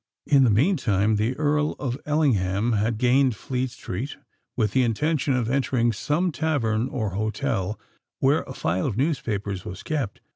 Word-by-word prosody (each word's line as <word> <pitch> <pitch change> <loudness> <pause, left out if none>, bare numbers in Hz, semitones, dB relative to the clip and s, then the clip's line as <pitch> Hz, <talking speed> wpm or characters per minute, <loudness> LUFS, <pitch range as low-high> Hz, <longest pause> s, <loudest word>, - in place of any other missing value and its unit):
In 140 -2 +5
the 125 - +4
meantime 110 - +2
the 115 +5 0
Earl 150 0 +1
of 130 -4 -3
Ellingham 115 -8 +1
had 110 +1 +1
gained 125 +1 +3
Fleet 130 +4 -2
Street, 120 +2 -6 0.4
with 110 -4 +1
the 130 - +3
intention 135 +4 +1
of 120 -3 0
entering 125 -2 +1
some 155 +10 0
tavern 130 -6 0
or 110 -8 -2
hotel 105 0 -2 0.4
where 140 +4 +3
a 130 - -6
file 90 +2 -1
of 110 -6 -3
newspapers 110 - -1
was 90 0 -8
kept. 145 -9 -3
125 Hz, 155 wpm, -25 LUFS, 105-140 Hz, 0.4 s, In